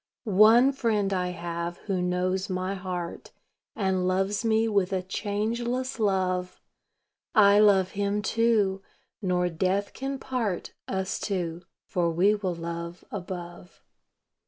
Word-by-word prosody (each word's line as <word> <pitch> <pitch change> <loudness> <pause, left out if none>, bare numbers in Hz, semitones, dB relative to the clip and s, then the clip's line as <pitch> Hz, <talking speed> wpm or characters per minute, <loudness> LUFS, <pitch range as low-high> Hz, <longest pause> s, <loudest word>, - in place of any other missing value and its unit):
One 225 +5 +6
Friend 215 -7 0
I 180 -1 0
have 170 -1 -4
who 190 -3 -1
knows 185 +2 0
my 185 +1 -2
heart, 180 -3 -5 0.5
And 190 -3 0
loves 195 +4 0
me 225 0 +2
with 200 -3 +1
a 185 -1 -1
changeless 235 +7 -2
love; 185 -3 0 0.8
I 205 -2 +7
love 195 -3 +5
Him, 205 +1 -1
too 215 -4 +2 0.4
nor 180 -2 +1
death 185 +4 -1
can 270 +1 -4
part 235 -9 -3
Us 190 0 -2
two, 175 -4 -3 0.2
for 175 -5 0
we 180 +5 +3
will 190 -4 -2
love 170 +1 -6
above. 180 -2 -8
190 Hz, 125 wpm, -27 LUFS, 180-210 Hz, 0.8 s, I